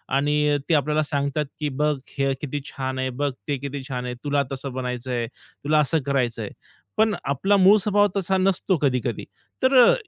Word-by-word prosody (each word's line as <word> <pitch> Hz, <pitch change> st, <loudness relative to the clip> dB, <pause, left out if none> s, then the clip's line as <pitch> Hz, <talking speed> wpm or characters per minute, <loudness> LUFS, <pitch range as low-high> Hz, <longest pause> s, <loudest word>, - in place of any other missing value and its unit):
आणि 145 Hz, +1 st, +2 dB
ते -, -, +4 dB
आपल्याला 150 Hz, +1 st, +2 dB
सांगतात 140 Hz, 0 st, -1 dB
की 150 Hz, -1 st, -1 dB
"बघ 150 Hz, +3 st, +1 dB, 0.2 s
हे 135 Hz, 0 st, +2 dB
किती 145 Hz, 0 st, -3 dB
छान 130 Hz, -2 st, -4 dB
आहे. 130 Hz, -, 0 dB
बघ 140 Hz, +3 st, -1 dB, 0.2 s
ते 145 Hz, -, 0 dB
किती 140 Hz, +1 st, -5 dB
छान 125 Hz, -2 st, -4 dB
आहे. 125 Hz, -, -3 dB
तुला 145 Hz, -1 st, +1 dB
तसं 135 Hz, 0 st, -5 dB
बनायचंय. 125 Hz, -1 st, -3 dB
तुला 150 Hz, +5 st, -2 dB
असं 150 Hz, +2 st, +3 dB
करायचंय." 120 Hz, -6 st, -1 dB, 0.5 s
पण 220 Hz, -1 st, +3 dB
आपला 190 Hz, +9 st, +2 dB
मूळ 195 Hz, +2 st, +7 dB
स्वभाव 205 Hz, +1 st, +3 dB
तसा 190 Hz, 0 st, +1 dB
नसतो 185 Hz, -1 st, +2 dB
कधी-कधी. 125 Hz, -5 st, 0 dB, 0.4 s
तर 260 Hz, +1 st, +4 dB
अ, -, -, +6 dB
145 Hz, 180 wpm, -24 LUFS, 130-155 Hz, 0.5 s, मूळ